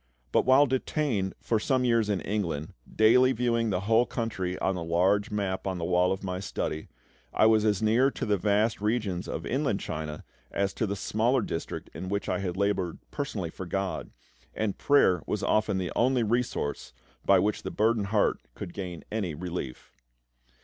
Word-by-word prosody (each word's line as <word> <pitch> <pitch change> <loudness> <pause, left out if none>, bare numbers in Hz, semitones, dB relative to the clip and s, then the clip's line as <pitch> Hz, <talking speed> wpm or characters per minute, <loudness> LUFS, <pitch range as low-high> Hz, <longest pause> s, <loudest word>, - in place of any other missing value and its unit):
But - - +2
while 130 +3 +7
detained 130 -6 -1
for 115 - 0
some 130 +3 +1
years 115 -3 +2
in 100 -3 0
England, 85 -8 -2 0.2
daily 125 +4 +5
viewing 115 -1 +1
the 90 -2 0
whole 115 +4 +3
country 95 -6 -3
on 95 - 0
the 90 -2 -4
large 95 +6 +2
map 100 -3 -2
on 95 -1 -1
the 85 - -3
wall 90 +1 +3
of 95 +1 -3
my 90 -1 -3
study, 80 -4 -3 0.4
I - - +3
was 110 -1 +4
as 105 -1 +1
near 115 +5 +4
to - - -4
the 105 - +2
vast 105 +2 +1
regions 105 -5 -1
of - - -4
Inland - - 0
China 75 0 -5 0.3
as 100 0 -1
to 110 - -1
the 100 - -2
smaller 115 +6 +1
districts 80 - -5
in 95 - -6
which 100 +1 -2
I - - 0
had 95 -2 -3
laboured 100 -4 0
personally 105 - -3
for 95 - -7
GOD; 95 +2 -2 0.5
and 105 -3 -1
prayer 95 - +4
was - - -2
often 105 -2 +2
the 90 -1 -2
only 125 0 +3
resource 115 -10 -1 0.3
by 100 - +5
which 105 +3 +1
the - - -4
burdened 110 -1 +1
heart 105 0 +2 0.2
could 85 - -7
gain 90 -4 -6
any 100 -8 -2
relief. 85 -6 -6
100 Hz, 185 wpm, -28 LUFS, 90-115 Hz, 0.5 s, while